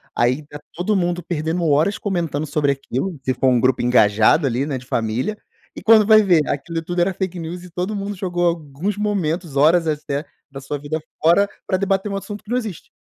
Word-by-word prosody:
aí 125 +5 +1
tá 145 0 -10
todo 180 +5 -1
mundo 175 -2 0
perdendo 165 +1 -2
horas 155 +7 +2
comentando 170 -7 -2
sobre 145 -1 +1
aquilo 140 +5 -4
se 130 - 0
for 130 - 0
um 125 -2 +4
grupo 130 0 +2
engajado 120 +4 +4
ali, 130 +1 0
né, 145 -3 -3
de 125 - -11
família. 120 - -2 0.4
E - - -8
quando 220 -1 +6
vai 215 -1 +8
ver 180 -6 +4
aquilo 165 +4 -3
tudo 175 +2 -3
era 190 +2 +1
fake 185 -1 -4
news, 170 +2 -6
e 180 - -11
todo 180 +5 -3
mundo 200 0 -4
jogou 175 -2 -1
alguns 170 +3 -2
momentos, 180 -7 -2
horas 160 +4 +4
até, 150 -1 -2 0.3
da 135 - -7
sua 135 +2 -4
vida 145 +3 -3 0.2
fora 170 +6 +4 0.2
para 185 - 0
debater 195 +1 0
um - - -2
assunto 205 +1 -7
que 210 - -17
não 245 - +1
existe. 215 -9 -6
165 Hz, 210 wpm, -20 LUFS, 140-190 Hz, 0.4 s, vai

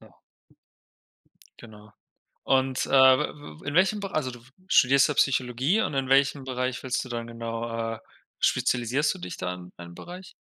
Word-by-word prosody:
ja. - - -18 1.5
Genau. 105 -2 -14 0.5
Und, 130 -1 +1
äh, - - -9
w 130 - +3
w - - -16
in 145 - -3
welchem 195 +4 +3
Be 195 -1 -6
also 130 -5 -1
du 120 - -11 0.3
studierst 140 -4 +5
ja 150 - -1
Psychologie, 130 - +1
und 150 - -2
in 135 -1 -1
welchem 135 0 +3
Bereich 130 -1 -3
willst 130 -1 -2
du - - -10
dann 115 -1 -5
genau, 115 0 -4
äh - - -10 0.4
spezialisierst 125 +5 +1
du - - -11
dich 90 0 -8
da 90 0 -3
in 90 0 -11
einem 85 0 -10
Bereich? 180 - -10
130 Hz, 170 wpm, -26 LUFS, 115-140 Hz, 1.5 s, studierst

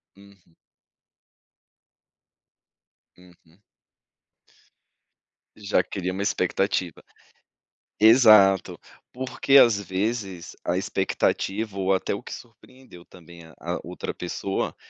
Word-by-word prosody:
Uhum. 100 -4 -21 2.6
Uhum. 90 0 -22 2.0
Já 105 -1 0
cria 95 -1 -5
uma 95 - -5
expectativa. 90 -3 -1 1.0
Exato! 110 -4 +5 0.3
Porque, 130 +2 +1
às 115 -6 +5
vezes, 100 -1 -4
a - - 0
expectativa 105 0 -2
ou 95 0 +1
até 95 - -1
o - - -9
que - - -9
surpreendeu 120 -5 -15
também 85 -1 -15
a 80 - -17
a - - -4
outra - - -6
pessoa, 95 +2 -4
95 Hz, 90 wpm, -24 LUFS, 90-110 Hz, 2.6 s, Exato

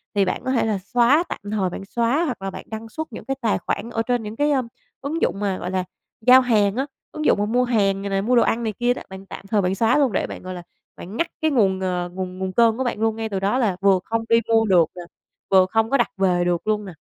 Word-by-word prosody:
thì 200 -1 +3
bạn 185 - -2
có 260 - 0
thể 250 - +2
là 215 -2 0 0.2
xóa 250 +7 +5
tạm - - -4
thời 195 -4 0
bạn 195 +2 -7
xóa, 240 - 0
hoặc 250 -10 -4
là 195 - -4
bạn - - -9
đăng 220 0 -7
xuất 315 +7 -5
những - - -8
cái 270 - -2
tài 225 - +1
khoản 210 +3 -3
ở 230 -1 -1
trên 240 0 -1
những 210 +1 -6
cái, 295 +2 +1
ờm, 260 -4 +1 0.3
ứng 310 +4 -3
dụng 195 - 0
mà, 200 -2 -1
gọi 180 - -5
là, 185 -1 0 0.4
giao 255 +3 +7
hàng 215 -4 +2
á, 265 - 0 0.3
ứng 305 0 -5
dụng - - +4
mà 205 - +1
mua 245 +4 +1
hàng 200 -5 +1
này 200 - -4
nè, 195 0 0
mua 245 +5 +1
đồ 235 - +5
ăn 235 +1 0
này 220 - -2
kia 245 0 +2
đó, - - -8
bạn 190 0 -10
tạm 195 - -10
thời 205 0 +2
bạn 185 +1 0
xóa 225 +5 +3
luôn. 275 -5 +3
Để - - -1
bạn, - - -8
gọi 185 0 -6
là, 175 -1 -8 0.3
bạn 195 +6 -8
ngắt 335 - +1
cái 315 -1 +2
nguồn, 195 -7 +2
ờ, 180 -1 -2
nguồn 185 -1 -5
nguồn 190 0 -2
cơn 230 -1 +4
của 260 - -1
bạn 240 -4 -2
luôn 225 -1 +1
ngay 225 -1 -4
từ 195 -2 -2
đó, 200 +5 +1
là 215 -8 +1
vừa 195 -2 +4
không 225 0 -2
đi 230 0 +5
mua 225 -1 +4
được 180 -5 +5
nè, 180 - -7 0.5
vừa 190 -1 +6
không 225 +3 0
có 275 - +3
đặt - - +1
về 180 -2 +2
được 175 +3 -1
luôn 210 -1 0
nè. 185 - -8
220 Hz, 295 wpm, -22 LUFS, 195-240 Hz, 0.5 s, giao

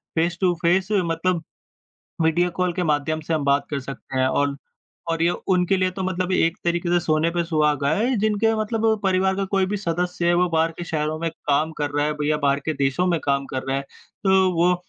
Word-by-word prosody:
Face 170 +2 +1
to 180 -2 +3
face 185 +3 +2
मतलब 170 -3 0 0.8
video 170 +2 +2
call 180 +1 -1
के 185 - -1
माध्यम 155 0 0
से 160 +1 -2
हम 150 - -1
बात 140 0 +2
कर 140 -2 -2
सकते 130 0 -6
हैं। 130 - +3
ऑल 140 +1 0 0.5
और 165 0 -1
ये 170 - +4 0.2
उनके 180 +2 +2
लिए 185 0 +1
तो 190 +1 -5
मतलब 185 0 -1
एक 165 0 +2
तरीक़े 170 0 0
से 175 - +3
सोने 160 0 +1
पे 170 0 -1
सुहागा 150 -4 +1
है 245 +4 +1
जिनके 220 +1 +2
मतलब 215 +1 -2 0.2
परिवार 190 0 +2
का 195 - 0
कोई 190 -1 +3
भी 205 +2 -2
सदस्य 175 -2 -2
है 175 - +4
वो 180 +1 +2
बाहर 165 0 +1
के 175 - -4
शहरों 155 -1 -2
में 165 -1 -1
काम 150 +2 -1
कर 145 -1 -1
रहा 145 +1 0
है 150 - 0
भईया 150 +1 +1
बाहर 140 0 +2
के 160 - +1
देशों 135 +7 +1
में 170 -2 +2
काम 140 -1 +1
कर 130 -1 -3
रहा 135 - 0
है, 135 - -2 0.4
तो 190 -1 +4
वो 175 +2 +3
170 Hz, 225 wpm, -23 LUFS, 150-185 Hz, 0.8 s, ये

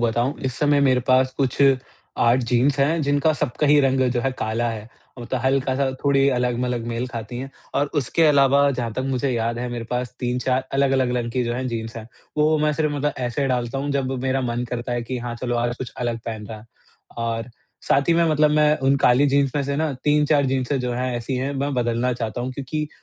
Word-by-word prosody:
बताऊँ 120 +3 +1
इस 130 -2 -1
समय 145 -1 +3
मेरे 130 -2 +3
पास 130 0 +4
कुछ 135 -3 0 0.6
8 120 +1 +4
जीन्स 125 +4 +1
हैं, 155 +4 +2
जिनका 145 +2 +2
सबका 150 -1 -1
ही 145 +1 +5
रंग 135 -1 +2
जो 120 - 0
है 135 - 0
काला 115 +2 -1
है, 110 -1 -7 0.3
मतलब 120 +1 -3
हल्का-सा 135 0 +1
थोड़ी 140 -1 +4
अलग-मलग 125 -1 -1
मेल 120 +2 -2
खाती 120 0 -6
है 135 +2 -6 0.2
और 140 +1 +2
उसके 145 +5 0
अलावा 140 -1 +4
जहाँ 120 -4 -3
तक 130 - -3
मुझे 135 0 0
याद 115 -1 -1
है 125 0 -3
मेरे 120 -1 -4
पास 125 0 -3
3-4 125 +1 0
अलग-अलग 135 -2 +2
रंग 120 -1 -2
की 125 - 0
जो 120 0 -2
है 130 +1 -3
जीन्स 115 -1 -5
है। 110 -1 -7 0.3
वो 155 +1 +3
मैं 150 0 +2
सिर्फ 150 0 0
मतलब 145 0 -1
ऐसे 125 +2 -1
डालता 125 0 -1
हूँ 140 +1 -2
जब 135 -1 -1
मेरा 135 0 0
मन 120 -1 -2
करता 120 0 -3
है 120 0 -1
कि 125 +2 -4
हाँ, 120 0 -5
चलो 120 0 -2
आज 120 0 -1
कुछ 130 - -7
अलग 120 -1 -2
पहन 110 -2 -5
रहा 110 0 -8
है 105 - -16 0.5
और 115 +1 -3 0.4
साथ 140 +2 +2
ही 170 - +6
में 170 0 +3
मतलब 150 0 +3
मैं 150 0 +4
उन 135 +1 +4
काली 125 +4 +5
जीन्स 140 0 +2
में 140 - +1
से 140 +1 -2
ना 155 0 0
3-4 150 -1 +3
जिन्सें 135 +1 0
जो 125 -1 -2
है, 125 +1 -2
ऐसी 120 +3 -3
है, 135 +3 -2
मैं 140 +1 -1
बदलना 120 +1 0
चाहता 115 0 -4
हूँ, 125 +2 -3
क्योंकि 145 +3 -4
130 Hz, 225 wpm, -22 LUFS, 120-140 Hz, 0.6 s, ही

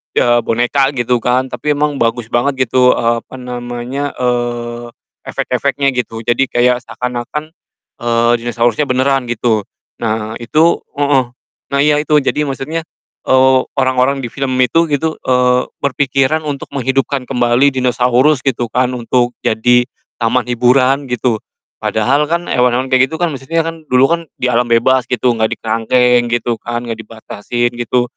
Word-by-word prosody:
iya 120 0 +3
boneka 120 +5 +1
gitu 120 0 +1
kan, 125 +2 0
tapi 145 +5 -1
emang 145 -1 -1
bagus 115 0 -1
banget 130 +2 +1
gitu, 125 0 +4
eee, 115 0 +1
apa - - -13
namanya, 125 +2 -5
eee, 120 -1 -2 0.4
efek-efeknya 140 +2 0
gitu. 115 -2 -4
Jadi 125 +2 +2
kayak 125 0 +2
seakan-akan, 125 +5 -5 0.5
eee, 120 0 +2
dinosaurusnya 120 +3 0
benaran 130 0 +1
gitu. 115 -2 +1 0.4
Nah 110 -1 -2
itu 155 +8 +2 0.2
heeh, 140 -2 +3 0.5
nah 140 - 0
iya 150 0 +3
itu. 150 0 +2
Jadi 150 +1 0
maksudnya, 140 +4 -3 0.5
eee, 130 0 +5 0.2
orang-orang 130 +1 +2
di 115 - -7
film 135 -2 -2
itu 140 +7 +2
gitu, 155 +2 0
eee, 125 0 +2
berpikiran 140 +2 +1
untuk 140 -2 -5
menghidupkan 135 0 -1
kembali 125 +1 +3
dinosaurus 125 +2 +2
gitu 125 -3 -1
kan 125 0 +1
untuk 120 +1 0
jadi 125 +2 +3 0.3
taman 120 +2 +1
hiburan 130 +3 +2
gitu 125 -2 -1 0.4
padahal 135 +7 +1
kan 170 +2 -1
hewan-hewan 125 +1 +1
kayak 130 0 +4
gitu 160 - -6
kan, 175 0 -1
maksudnya 155 +4 -2
kan, 165 -1 -7
dulu 125 +1 +3
kan 170 - +2 0.2
di 125 0 -1
alam 120 +1 +1
bebas 120 +2 +2
gitu, 125 0 +1
enggak 110 -2 0
dikerangkeng 120 +2 +2
gitu 120 -1 -1
kan, 120 +1 -4
enggak 115 -2 -5
dibatasin 115 +2 -4
gitu, 120 +1 0
125 Hz, 150 wpm, -15 LUFS, 120-135 Hz, 0.5 s, eee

